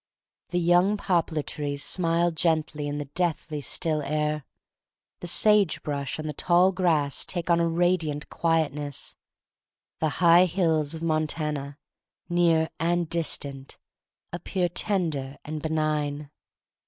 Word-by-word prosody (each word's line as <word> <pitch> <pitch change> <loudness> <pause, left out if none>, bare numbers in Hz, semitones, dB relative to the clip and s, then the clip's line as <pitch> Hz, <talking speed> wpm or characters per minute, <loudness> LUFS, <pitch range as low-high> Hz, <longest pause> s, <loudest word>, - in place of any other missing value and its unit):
The 180 - -1
young 175 +4 +3
poplar 170 -6 0
trees 145 -1 -4
smile 170 -1 +2
gently 155 -3 0
in 145 0 -3
the 145 - -4
deathly 160 0 -2
still 155 +1 -1
air. 150 0 -2 0.7
The 175 - -6
sage 205 0 +4
brush 140 -3 -3
and 155 0 -5
the 150 - -3
tall 175 +5 +3
grass 165 -7 +1
take 175 -1 -3
on 170 - +4
a 170 - +2
radiant 165 -3 0
quietness. 150 -4 -1 0.8
The 160 - +1
high 175 +1 +6
hills 165 -4 0
of 160 - -7
Montana, 150 -3 -2 0.5
near 170 -2 +2
and 175 +1 +1
distant, 140 -5 -1 0.6
appear 180 0 -2
tender 160 -9 -1
and 155 0 -5
benign. 150 -2 -2
160 Hz, 125 wpm, -26 LUFS, 150-175 Hz, 0.8 s, high